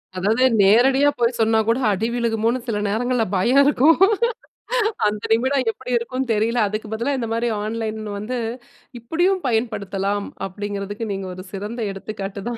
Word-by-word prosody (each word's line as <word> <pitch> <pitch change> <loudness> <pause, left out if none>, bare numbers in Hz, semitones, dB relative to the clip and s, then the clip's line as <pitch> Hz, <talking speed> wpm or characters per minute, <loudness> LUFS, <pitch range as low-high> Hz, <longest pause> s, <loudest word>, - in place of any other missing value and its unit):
அதாவது 210 +7 +1 0.2
நேரடியா 260 +8 +5
போய் 235 0 +1
சொன்னா 225 0 +3
கூட 230 +3 +2
அடி 215 +4 -1
விழுகுமோன்னு 230 0 0
சில 225 -3 -1
நேரங்கள்ல 245 +3 0
பயம் 245 +9 +4
இருக்கும். 290 +2 +4 1.1
அந்த 210 0 -2
நிமிடம் 260 +2 +1
எப்படி 250 - -8
இருக்குன்னு 255 +1 -3
தெரியல. 225 +3 +1
அதுக்கு 215 +2 -4
பதிலா 235 +6 -1
இந்த 235 -3 -3
மாரி 230 +1 0 0.2
ஆன்லைன்னு 215 -1 -4
வந்து, 240 +5 -4 0.6
இப்படியும் 350 - 0
பயன்படுத்தலாம் 205 -4 -1 0.2
அப்படிங்கிறதுக்கு 205 +2 -5
நீங்க 195 -1 -5
ஒரு 185 - -8
சிறந்த 210 +5 -5
எடுத்துக்காட்டு 195 0 -6
தான். 240 - -4
225 Hz, 145 wpm, -21 LUFS, 205-245 Hz, 1.1 s, நேரடியா